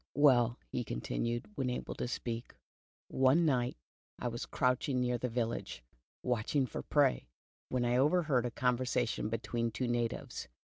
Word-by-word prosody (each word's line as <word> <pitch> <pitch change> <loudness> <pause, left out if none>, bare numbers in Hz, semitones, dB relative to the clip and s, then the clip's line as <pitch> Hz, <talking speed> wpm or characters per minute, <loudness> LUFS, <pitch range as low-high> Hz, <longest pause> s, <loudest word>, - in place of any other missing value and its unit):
''Well," 125 -5 +5
he 125 - -1
continued, 115 - -2
when 135 -9 -1
able 125 - -3
to - - -3
speak, 120 -1 -4 0.5
"one 135 +6 +4
night 125 -5 +1 0.4
I 120 - -2
was 120 0 -5
crouching 125 0 +1
near 125 -1 +1
the 125 - -1
village, 115 - -3 0.4
watching 125 +3 +1
for 125 - -5
prey, - - +2 0.4
when 125 -1 0
I 120 +1 +2
overheard 145 -3 +3
a - - -2
conversation 125 -2 0
between 115 +1 -1
two 125 +3 -2
natives. 120 - -2
125 Hz, 145 wpm, -33 LUFS, 120-130 Hz, 0.5 s, Well